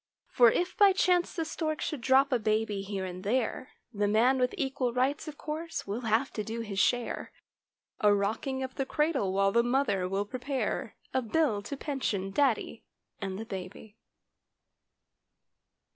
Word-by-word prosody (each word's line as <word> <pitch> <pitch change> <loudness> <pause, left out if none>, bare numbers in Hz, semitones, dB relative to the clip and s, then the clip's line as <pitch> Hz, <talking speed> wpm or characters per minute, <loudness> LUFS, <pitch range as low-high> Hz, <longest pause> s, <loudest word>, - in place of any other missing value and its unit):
For 240 -2 +6
if 355 +10 -1
by 400 -2 +6
chance 360 -2 +2
the 330 - -1
stork 310 0 -2
should 300 -5 -3
drop 265 +3 +4
a 250 - +2
baby 215 -2 0
here 195 -1 -4
and 185 0 -7
there; 245 +3 -1 0.2
The 205 0 +1
"man 240 +6 +3
with 250 +8 +1
equal 265 -5 -1
rights" 265 +5 0
of 295 -1 -7
course, 320 +2 -5
will 205 +5 -3
have 225 +5 +1
to 215 - -3
do 225 +2 -4
his 205 -4 -4
share 245 +4 0 0.7
A 210 -4 +5
rocking 220 +7 0
of 260 0 -5
the 270 - -2
cradle 300 - +1
while 195 +1 +2
the 235 - +4
mother 240 -7 +1
will 195 +2 -1
pre¬ 250 +4 -7
pare 270 0 -2 0.2
A 260 - +2
bill 235 -3 +1
to 275 +7 -6
pension 225 -10 -2
daddy 240 -2 0 0.4
and 190 -1 -3
the 225 - -5
baby. 195 +2 -8
240 Hz, 170 wpm, -29 LUFS, 205-275 Hz, 0.7 s, For